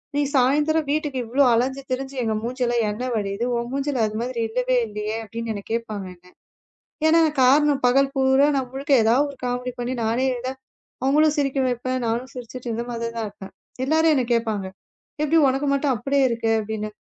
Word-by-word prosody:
நீ 290 - +2
சாயந்தரம் 295 +4 +2
வீட்டுக்கு 295 -3 -1
இவ்ளோ 260 +5 +2
அலைஞ்சு 265 +4 0
திரிஞ்சு 265 +1 -3
எங்க 220 -1 0
மூஞ்சில 245 0 -1 0.2
எண்ணெய் 245 +4 -3
வடியுது. 200 +1 -2
உன் 235 0 -3
மூஞ்சில 275 -2 -1
அது 215 0 -5
மாதிரி 245 -2 -3
இல்லவே 250 +2 +1
இல்லையே 210 +1 -4
அப்படின்னு 225 -1 -5
கேப்பாங்க 220 -4 -3
என்ன. 180 +1 -23 0.8
ஏன்னா 330 +1 +5 0.2
காரணம் 280 +2 +4
பகல் 275 +2 +3
பூரா 265 +1 +4
நான் 265 -2 -1
உனக்கு 275 +1 +1
எதாவது 240 +6 +3
ஒரு 280 - -12
காமெடி 250 0 -2
பண்ணி 245 +1 -2
நானே 235 +4 +1 0.8
அவங்கள 295 +4 +4
சிரிக்க 275 -1 0
வைப்பேன். 255 +1 -2
நானும் 235 +3 -2
சிரிச்சுட்டு 250 0 -8
இருந்த 235 +1 -3
மாதிரி 230 0 -4
தான் 225 -1 -2
இருப்பேன். 200 -1 -12 0.3
எல்லாரும் 315 +2 +3
என்ன 255 -3 +1
கேப்பாங்க. 220 -4 -1 0.6
எப்படி 315 +2 +3
உனக்கு 270 +2 -1
மட்டும் 275 -1 +1
அப்படியே 275 +3 +1
இருக்கே 230 -1 0
அப்படின்னு? 215 0 -4
250 Hz, 170 wpm, -23 LUFS, 230-275 Hz, 0.8 s, ஏன்னா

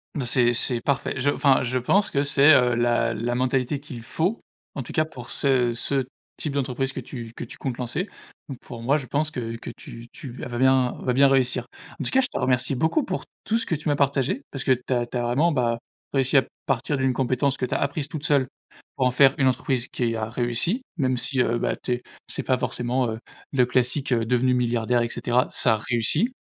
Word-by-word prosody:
Bah, 135 - -2
c'est 120 0 +4
c'est 120 0 +3
parfait. 140 +1 -1
Je 145 +2 +2
enfin, 135 -2 +3
je 130 +1 -1
pense 190 +11 +2
que 140 +1 +1
c'est, 145 +2 +6
heu, 125 -3 +4
la 120 -1 +1
la 115 +2 -2
mentalité 130 +2 0
qu'il 140 -5 -9
faut. 170 - -2 0.3
En 135 - -3
tout - - -9
cas, 155 - +1
pour 125 -6 -11
ce 130 -4 +2
ce 135 +3 0 0.3
type 150 - -4
d'entreprise 135 -1 -1
que 135 - -6
tu 120 -2 -8
que - - -6
tu - - -11
comptes 130 -3 -4
lancer, 130 - -3 0.4
donc 130 - -6
pour 115 -1 -10
moi, 140 +6 +2
je 135 - -6
pense 150 +4 -1
que 115 -4 -4
que 115 - -8
tu 115 0 -11
tu 135 -5 -9
vas 120 -1 -6
bien 130 -1 +3
vas 125 - 0
bien 135 +2 +5
réussir. 125 -2 +2 0.3
En - - -4
tout - - -2
cas, 265 - +4
je 255 - +2
te - - -6
remercie 125 +1 +1
beaucoup 160 - +1
pour - - -3 0.2
tout 225 - +1
ce - - -1
que - - -2
tu 155 +1 -6
m'as 145 - +2
partagé. 140 - +1
Parce 135 - -4
que 130 - +5
tu 125 +1 -3
as 120 -1 +1
tu 125 - -5
as - - 0
vraiment, 145 +8 +2
bah, 120 -3 0 0.3
réussi 135 0 +1
à 135 - +7 0.2
partir 135 +2 0
d'une 130 -1 +1
compétence 130 +2 0
que 130 - -2
tu - - -4
as - - +1
apprise 140 +1 -2
toute 155 -1 -5
seule. 140 -5 +3 0.5
Pour 130 - +2
en 125 - +3
faire 135 +2 +5
une 130 - +3
entreprise 125 0 0
qui 115 -2 -1
a 110 -1 -2
réussi, 120 - 0 0.2
même 130 -3 +1
si, 130 +2 +1
heu, 120 -1 +1
bah - - 0
tu - - -6
es 120 - -3 0.3
c'est - - -3
pas - - +1
forcément, 125 +1 -1
heu, 110 - -5 0.3
le 130 -3 +3
classique, 125 +2 +1
heu, 115 -1 +1
devenu 125 +2 +2
milliardaire, 120 -1 +1
et 120 - -1
cetera. 125 +4 0
Ça 115 -4 +2
a - - +1
réussit, 120 - +1
130 Hz, 240 wpm, -24 LUFS, 120-140 Hz, 0.5 s, à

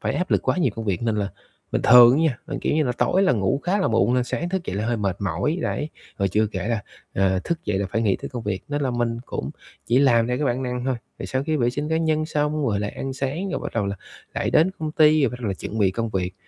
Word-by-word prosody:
phải - - -1
áp 180 - -2
lực - - +2
quá - - +3
nhiều 160 -9 +2
công 115 - -4
việc. 100 -3 -1
Nên 115 -2 0
là 100 -1 -1 0.4
bình - - 0
thường 120 +1 +8
á - - +2
nha 150 -8 +1
là, - - -4
kiểu - - 0
như 155 0 +2
là, 125 - 0
tối 185 +9 +2
là 190 - +4
ngủ 105 +3 0
khá 190 +3 +1
là - - +2
muộn 115 +2 +2
nên 125 - +2
sáng 170 +7 -3
thức 185 -1 -2
dậy 95 - -3
là 105 +2 -1
hơi 120 0 0
mệt 100 -3 -1
mỏi, 150 - -1
đấy. 150 - -2 0.3
Rồi 100 -1 +1
chưa 105 +3 +2
kể 100 0 -4
là, 115 -3 -1 0.3
à, 95 -1 +1
thức 170 -2 -3
dậy 105 -2 0
là 100 - -1
phải 110 - 0
nghĩ 100 -4 +2
tới - - -7
công 120 -3 -6
việc, 105 -3 -3
nên 145 0 -2
là 135 - 0
mình 120 -1 -1
cũng - - -4 0.4
chỉ 120 +2 +3
làm 120 -5 +4
theo 125 +1 -1
cái 150 - 0
bản 125 +1 0
năng 125 -1 -3
thôi. 130 0 +1 0.2
Rồi - - -5
sau 130 +1 -1
khi 155 0 0
vệ 120 -4 +2
sinh 145 +4 -3
cá 160 - +1
nhân 155 -1 +1
xong 150 -1 0
rồi 100 -3 0
là 105 - -2
ăn 135 - -3
sáng, 140 +9 -3
rồi - - -2
bắt - - -5
đầu 110 -3 0
là 100 0 -3 0.4
lại - - -1
đến 165 +4 +4
công 155 -1 -3
ty, 155 -1 +5
rồi 135 - +3
bắt 125 - -8
đầu 115 - -2
là 95 - -1
chuẩn 110 +4 -6
bị 100 -3 +4
công 115 +4 -2
việc. 90 -2 -2
125 Hz, 305 wpm, -23 LUFS, 105-150 Hz, 0.4 s, thường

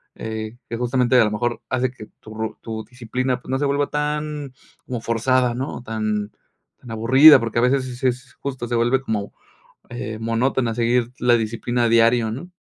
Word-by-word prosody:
eh, 110 +1 -6
que 115 - -3
justamente 125 +1 +2
a - - +5
lo 105 - -1
mejor 120 +3 -2
hace 130 -1 0
que 110 -4 -12
tu 110 - -12
ru 110 0 -4
tu 110 -1 -5
disciplina, 125 +2 -3
pues, 130 - -9
no 130 - 0
se 145 - +1
vuelva 140 0 +1
tan 150 -1 -3 0.3
como 125 -3 -4
forzada, 120 +2 +1
¿no? 135 +3 -4
O, - - -10
tan 110 -2 -2 0.5
tan 120 - -12
aburrida, 130 +7 +7
porque 115 0 -1
a - - +2
veces 130 +2 +2
sí 130 - -6
es 125 - -9
sí 130 - +1
es 125 0 -3
justo. 130 -3 -4
Se - - -3
vuelve 120 +3 +2
como, 110 -6 -3 0.6
eh, 110 -2 -6
monótona 115 +2 0
a - - -5
seguir 120 +1 +1
la 125 -1 +4
disciplina 115 +1 -1
diario, 115 0 +4
¿no? 175 +10 -7
120 Hz, 205 wpm, -22 LUFS, 115-130 Hz, 0.6 s, aburrida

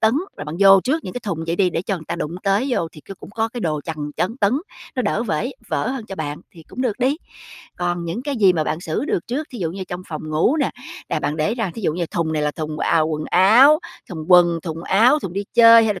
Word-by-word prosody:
tấn, 220 +1 +4 0.2
rồi 150 - -6
bạn 150 +2 -6
vô 195 -1 +8
trước 310 +5 0
những - - -6
cái 250 - -5
thùng 175 -7 -4
vậy 170 +1 -1
đi 185 -3 +2
để 165 - -2
cho 195 - -2
người 165 -3 -8
ta 170 - -4
đụng 165 0 -4
tới 200 +6 +1
vô 170 -10 0
thì 150 - -13
c 195 +7 -11
cũng - - -12
có 225 +1 -1
cái 240 +1 -7
đồ 155 -4 -1
chằn, 160 -2 -5 0.2
chấn, 225 +7 -1
tấn, 205 -2 +2 0.4
nó - - +1
đỡ - - 0
vể - - -2 0.2
vỡ - - -1
hơn 260 -5 -5
cho 195 - -7
bạn 150 -3 -5
thì 165 - -15
cũng 255 - -5
được 235 -3 -1
đi. 265 +4 +1 0.6
Còn 175 -1 -2
những 170 +9 -4
cái 285 -2 -3
gì 195 -4 +5
mà 155 -3 0
bạn 155 +2 -2
xử 165 - -2
được 175 - -2
trước, 290 +6 -3
thí 245 - -8
dụ 165 -3 -2
như 190 +1 -6
trong 180 +1 -5
phòng 155 -1 -6
ngủ 165 - +2
nè, 285 - +1 0.4
là - - -1
bạn 150 - -2
để 185 +9 0
ra 225 -7 -2
thí 225 - -7
dụ 155 - +1
như 170 0 -2
thùng 160 -1 -2
này 150 -1 -1
là 150 - +1
thùng, 155 0 -5
à, 165 - +2
quần 155 -1 -1
áo, 240 - +6 0.3
thùng 160 -3 -6
quần, 175 -2 +5
thùng 165 -1 -5
áo, 240 +12 +4
thùng 185 - -6
đi 200 +1 -3
chơi 230 -1 +8
hay 210 -2 +1
là 185 - -9
185 Hz, 285 wpm, -21 LUFS, 160-230 Hz, 0.6 s, vô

